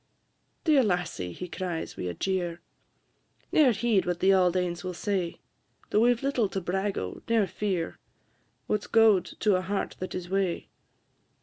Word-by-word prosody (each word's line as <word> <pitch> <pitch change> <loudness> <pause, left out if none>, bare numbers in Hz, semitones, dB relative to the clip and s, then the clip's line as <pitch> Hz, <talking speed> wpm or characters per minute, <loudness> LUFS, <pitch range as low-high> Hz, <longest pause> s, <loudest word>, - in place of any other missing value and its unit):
"Dear 300 -5 +5
lassie," 180 - -1
he 180 - -7
cries, 175 -2 -4
wi' - - -5
a 90 - -3
jeer, 175 -3 -1 0.9
"Ne'er 290 -5 +5
heed 220 -3 +1
what 175 -1 -1
the 195 +2 +5
auld 185 -1 +3
anes 175 -1 -2
will 180 -1 -4
say; 185 -3 -2 0.5
Though 210 - +4
we 240 +2 +5
've 240 +1 -2
little 255 -7 +1
to 195 - -2
brag 190 +3 -1
o', 90 0 -4
near 225 -3 +4
fear 185 -3 -3 0.7
What 210 - 0
's - - -10
gowd 220 -5 +5 0.2
to 205 -3 +4
a - - -1
heart 195 +2 -3
that 185 - -5
is 180 -1 -4
wae? 190 -2 -1
190 Hz, 175 wpm, -28 LUFS, 175-210 Hz, 0.9 s, Dear